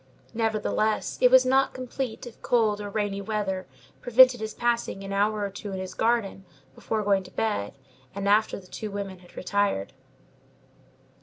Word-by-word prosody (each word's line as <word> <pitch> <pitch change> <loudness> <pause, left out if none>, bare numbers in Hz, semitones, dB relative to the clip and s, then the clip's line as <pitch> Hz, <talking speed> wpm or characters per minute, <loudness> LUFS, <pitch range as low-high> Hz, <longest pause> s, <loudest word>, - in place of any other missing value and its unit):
Nevertheless, 220 -1 0
it 250 - +7
was 260 0 +7
not 265 +1 +2
complete 255 -2 -5
if 240 - -12
cold 215 -4 +2
or 205 - -5
rainy 200 -1 -2
weather 195 -2 -3 0.3
prevented 250 +1 +6
his 220 0 -5
passing 235 -4 -1
an 195 0 -5
hour 210 +1 +1
or 200 - -5
two 200 +1 -7
in 190 - -4
his 185 0 -6
garden 225 -3 0 0.3
before 215 +8 -3
going 200 -1 +2
to 185 - -12
bed, 185 - -2 0.4
and 200 0 -3
after 210 +1 +3
the 190 - -16
two 215 +3 -6
women 200 -2 -5
had 175 -1 -19
retired. 200 - -1
210 Hz, 165 wpm, -26 LUFS, 195-230 Hz, 0.4 s, it